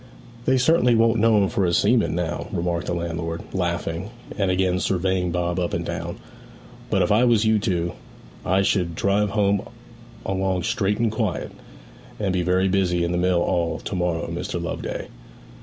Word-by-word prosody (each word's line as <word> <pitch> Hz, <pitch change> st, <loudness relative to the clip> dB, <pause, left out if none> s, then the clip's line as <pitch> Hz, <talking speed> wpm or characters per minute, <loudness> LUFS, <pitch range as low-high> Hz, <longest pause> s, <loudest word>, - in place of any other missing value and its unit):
'They 130 Hz, -, +3 dB
certainly 125 Hz, -3 st, +4 dB
won't 115 Hz, 0 st, +3 dB
know 115 Hz, 0 st, +4 dB
him 100 Hz, -1 st, +3 dB
for 115 Hz, -3 st, 0 dB
a 90 Hz, -, +2 dB
seaman 105 Hz, +1 st, +2 dB
now,' 85 Hz, -1 st, -2 dB
remarked 85 Hz, -1 st, -2 dB
the -, -, -1 dB
landlord, 85 Hz, -1 st, -3 dB
laughing, 85 Hz, 0 st, -2 dB, 0.3 s
and 100 Hz, -2 st, 0 dB
again 90 Hz, 0 st, +1 dB
surveying 95 Hz, -1 st, 0 dB
Bob 85 Hz, +1 st, -1 dB
up 90 Hz, -1 st, -1 dB
and -, -, -3 dB
down. -, -, -4 dB, 0.7 s
'But -, -, +2 dB
if -, -, 0 dB
I 110 Hz, +4 st, +4 dB
was 115 Hz, -3 st, +4 dB
you 110 Hz, -1 st, +3 dB
two, 90 Hz, -5 st, -1 dB, 0.5 s
I 95 Hz, +2 st, +2 dB
should 90 Hz, -4 st, 0 dB
drive 100 Hz, +3 st, +1 dB
home 100 Hz, -1 st, +2 dB, 0.6 s
along 95 Hz, -1 st, -1 dB
straight 105 Hz, -3 st, 0 dB
and 115 Hz, -2 st, +1 dB
quiet; 110 Hz, -4 st, -2 dB, 0.7 s
and 100 Hz, -3 st, 0 dB
be 90 Hz, -, +1 dB
very 90 Hz, +2 st, +2 dB
busy 90 Hz, -2 st, +1 dB
in 85 Hz, -, 0 dB
the 90 Hz, -, 0 dB
mill 90 Hz, -1 st, +2 dB
all 85 Hz, -2 st, 0 dB
to -, -, -6 dB
morrow, 90 Hz, -2 st, -1 dB
Mr. 85 Hz, +2 st, -4 dB
Loveday.' 85 Hz, -1 st, -4 dB
95 Hz, 175 wpm, -23 LUFS, 85-105 Hz, 0.7 s, certainly